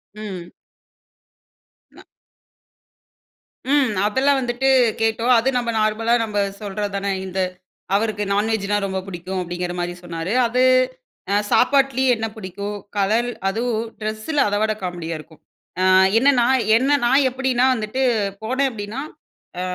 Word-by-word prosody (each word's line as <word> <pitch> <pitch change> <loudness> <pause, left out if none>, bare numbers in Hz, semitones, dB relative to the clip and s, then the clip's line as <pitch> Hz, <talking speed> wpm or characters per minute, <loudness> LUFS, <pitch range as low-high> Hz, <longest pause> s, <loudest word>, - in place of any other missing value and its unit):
ம். 190 -5 -7 1.4
ந - - -17 1.7
ம். 275 -6 +3 0.2
அதெல்லாம் 270 +5 +2
வந்துட்டு 245 +2 0 0.3
கேட்டோம். 225 +3 +2
அது 260 +4 +1
நம்ப 240 -1 -1
நார்மலா 215 +2 +1
நம்ம 210 -2 -4 0.2
சொல்றதுதானே, 200 -1 -3
இந்த 190 0 -4 0.6
அவருக்கு 210 -1 0
நான்வெஜ்ஜுனா 205 -1 0
ரொம்ப 190 -1 -2
புடிக்கும் 185 +1 -5
அப்டிங்கிற 175 0 -4
மாரி 175 0 -2
சொன்னாரு. 170 +3 -4
அது 250 +2 +1 0.7
அ - - +3 0.2
சாப்பாட்டுலயே 265 -1 +3
என்ன 225 0 -3
புடிக்கும், 200 0 -6 0.2
கலர் 220 +5 +1 0.2
அதுவும் 230 +1 -1
ட்ரெஸ்ஸில 215 +8 -2
அத 205 - -1
விட 215 0 +1
காமெடியா 175 -2 -4
இருக்கும். 160 0 -15 0.4
ஆ - - +2 0.3
என்னன்னா, 250 -1 +4 0.3
என்ன 275 +4 +2
நான் 265 +3 +4
எப்படின்னா 255 -1 +1
வந்துட்டு 220 +3 -3 0.4
போனே 260 +5 0
அப்டின்னா. 215 +4 -6 0.6
ஆ - - -2
215 Hz, 120 wpm, -21 LUFS, 195-245 Hz, 1.7 s, என்னன்னா